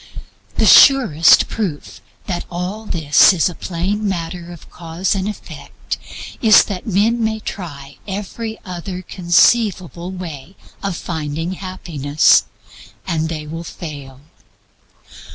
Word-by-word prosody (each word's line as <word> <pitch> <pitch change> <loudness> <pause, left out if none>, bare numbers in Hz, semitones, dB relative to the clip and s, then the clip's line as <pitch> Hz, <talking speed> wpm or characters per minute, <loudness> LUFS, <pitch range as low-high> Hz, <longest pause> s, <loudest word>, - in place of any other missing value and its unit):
The - - +2
surest 220 - +6
proof 185 -10 -5 0.2
that 180 -3 -4
all 185 +5 -5
this 155 +2 +5
is 180 0 +1
a - - -8
plain 195 +5 -3
matter 175 -1 -5
of 170 - -13
Cause 170 +2 -3
and 195 0 -2
Effect 210 - -8 0.4
is 220 -2 +7
that 195 -1 -6
men 220 +4 +1
may 220 0 -1
try 145 -9 -8
every 210 +3 -5
other 185 0 -6
conceivable 180 0 +1
way 175 -2 -8 0.3
of 195 -4 -3
finding 160 +1 -4
happiness, 165 -6 +1 0.6
and 160 -3 -1
they 155 -2 -5
will 165 +2 -7
fail. 140 -6 -9
180 Hz, 115 wpm, -18 LUFS, 160-200 Hz, 0.6 s, is